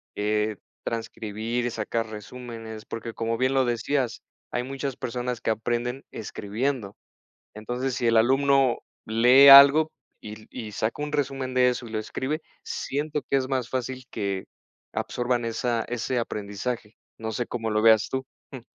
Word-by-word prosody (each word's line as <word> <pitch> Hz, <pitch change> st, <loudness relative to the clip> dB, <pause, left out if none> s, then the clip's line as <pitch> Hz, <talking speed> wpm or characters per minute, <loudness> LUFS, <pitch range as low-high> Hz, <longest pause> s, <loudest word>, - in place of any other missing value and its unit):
eh, 105 Hz, 0 st, 0 dB, 0.3 s
transcribir, 115 Hz, +1 st, -3 dB
sacar 115 Hz, +1 st, -2 dB
resúmenes 110 Hz, 0 st, -8 dB
porque 115 Hz, 0 st, -6 dB
como 115 Hz, 0 st, -2 dB
bien 130 Hz, +2 st, +1 dB
lo 135 Hz, -1 st, +3 dB
decías, 120 Hz, +1 st, -1 dB, 0.3 s
hay 125 Hz, -, -1 dB
muchas 135 Hz, 0 st, -4 dB
personas 125 Hz, 0 st, -3 dB
que -, -, 0 dB
aprenden 120 Hz, +4 st, -2 dB
escribiendo. 110 Hz, +1 st, -3 dB, 0.6 s
Entonces 125 Hz, +4 st, -3 dB
si 125 Hz, -, -2 dB
el 115 Hz, -1 st, +4 dB
alumno 135 Hz, +2 st, +4 dB, 0.3 s
lee 125 Hz, +5 st, +7 dB
algo 140 Hz, +3 st, +10 dB, 0.3 s
y 110 Hz, 0 st, -10 dB
y 110 Hz, -4 st, -7 dB
saca 110 Hz, +8 st, -2 dB
un 150 Hz, 0 st, -4 dB
resumen 135 Hz, -3 st, -1 dB
de 125 Hz, 0 st, +5 dB
eso 125 Hz, -1 st, -3 dB
y -, -, -10 dB
lo 110 Hz, -, -1 dB
escribe, 135 Hz, +8 st, -3 dB, 0.2 s
siento 150 Hz, +2 st, -3 dB
que 140 Hz, -, +3 dB
es 130 Hz, -, -1 dB
más 130 Hz, -3 st, -1 dB
fácil 130 Hz, 0 st, -3 dB
que 100 Hz, -3 st, -2 dB, 0.5 s
absorban 120 Hz, -1 st, -1 dB
esa 115 Hz, 0 st, -1 dB
ese 120 Hz, +1 st, -1 dB
aprendizaje. 105 Hz, +1 st, -4 dB, 0.2 s
No 110 Hz, 0 st, -4 dB
sé 120 Hz, +3 st, -2 dB
¿cómo 115 Hz, -2 st, -3 dB
lo 110 Hz, 0 st, +1 dB
veas 110 Hz, -1 st, +6 dB
tú?, 130 Hz, 0 st, -3 dB, 0.3 s
mm. 130 Hz, -3 st, -8 dB
120 Hz, 155 wpm, -26 LUFS, 110-130 Hz, 0.6 s, algo